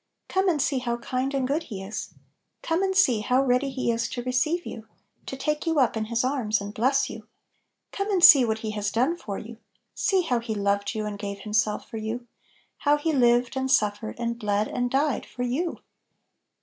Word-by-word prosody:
Come 380 0 +1
and 320 -4 +1
see 270 -1 +1
how 240 -1 -2
kind 255 +3 -2
and 265 -2 0
good 300 +4 -1
He 195 -4 -6
is 210 +3 -5
1 - - -26 0.4
Come 330 +2 0
and 380 -1 0
see 250 - +4
how 250 +5 +2
ready 255 +1 +2
He 255 -3 -1
is 230 0 -1
to 245 - -5
receive 260 +8 0
you, 220 -1 -8 0.4
to 270 - -5
take 300 +4 -2
you 325 -2 +2
up 250 -4 +3
in 220 -1 -1
His 235 +2 -1
arms 250 -5 0
and 200 +1 -7
bless 265 +5 +2
you. - - -9 0.6
Come 400 +1 -3
and 375 -4 +1
see 290 -8 +10
what 220 -2 0
He 215 - -2
has 210 -1 -2
done 255 +10 +1
for 205 - -6
you; 225 +1 -9 0.4
see 380 -2 +1
how 250 -7 0
He 230 -2 -4
loved 200 +1 0
you 215 -1 -2
and 205 -1 -5
gave 200 -1 -5
Himself 215 0 0
for 225 - -7
you; 220 +3 -4 0.5
how 290 0 +3
He 315 +2 -1
lived, 245 -1 +3
and 265 0 -1
suffered, 215 -3 +1
and 235 0 -2
bled, 210 -1 0
and 245 0 -2
died 275 +1 +1
for 245 - -5
you! 290 +8 -2
245 Hz, 215 wpm, -26 LUFS, 215-280 Hz, 0.6 s, see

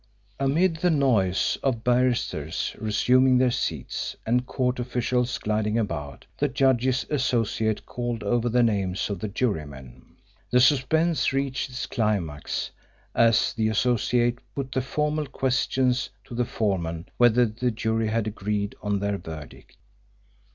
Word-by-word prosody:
Amid 160 +6 +2
the 180 +2 +2
noise 120 - +2
of 120 -5 -1
barristers 120 - 0
resuming 125 +4 +3
their 125 0 +3
seats - - -3
and 125 +2 +1
court 125 -1 -1
officials 125 0 -1
gliding 105 +1 -1
about, 75 -11 -4
the - - +2
judge's 130 -1 +2
Associate 115 -6 0
called 120 -1 -4
over 120 0 +1
the 120 +1 +3
names 100 -3 0
of 100 - -3
the 110 - -3
jurymen. 75 - -4 0.5
The 125 - +4
suspense 150 +6 +3
reached 135 -1 -1
its 125 0 -4
climax 95 -10 -2 0.4
as 115 -1 +3
the 110 -1 0
Associate 120 +2 +1 0.2
put 135 -2 -4
the 130 - 0
formal 150 +3 -1
questions 130 -1 0
to - - -12
the 120 +1 0
foreman 85 -6 -2
whether 120 0 +5
the 120 +3 -1
jury 110 0 -1
had 110 0 0
agreed 105 -1 -2
on 105 -1 0
their 100 -1 -1
verdict. 80 -3 -10
120 Hz, 135 wpm, -25 LUFS, 105-130 Hz, 0.5 s, whether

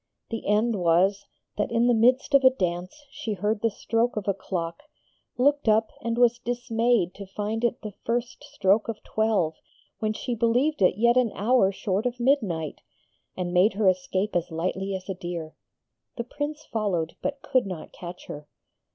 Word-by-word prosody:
The 225 - -4
end 210 +1 +2
was, 190 +4 +3 0.3
that 205 - +1
in 230 0 +3
the 245 - +4
midst 250 +5 +3
of 275 -1 +6
a 260 - +9
dance 185 - -3
she 275 -6 -4
heard 205 +2 -1
the 230 - +3
stroke 230 +2 -1
of 210 - -3
a 200 - +3
clock, 170 -3 -4 0.6
looked 280 -1 +3
up, 220 +1 +3
was 235 +1 +2
dismayed 240 -5 0
to 200 -1 -9
find 210 +4 -3
it 235 0 0
the 210 -2 -6
first 240 +1 -2
stroke 220 -8 +1
of 230 -2 -5
twelve 215 -7 +1 0.5
when 215 -1 0
she 245 - -3
believed 240 +5 +1
it 185 0 +4
yet 235 +2 +4
an 245 -4 +3
hour 210 -1 +3
short 200 +3 -1
of 245 0 -5
midnight, 210 - 0 0.6
and 175 -1 -3
made 185 +4 +4
her 205 0 +1
escape 185 +2 0
as 175 0 0
lightly 185 +4 -2
as 185 -1 -7
a 195 - -2
deer. 175 -4 -6 0.6
The 235 - -2
Prince 295 +5 -5
followed, 190 -7 -1
but 280 0 -3
could 255 -7 +1
not 180 -5 -7
catch 175 0 -9
her. 150 0 -8
215 Hz, 175 wpm, -26 LUFS, 185-240 Hz, 0.6 s, a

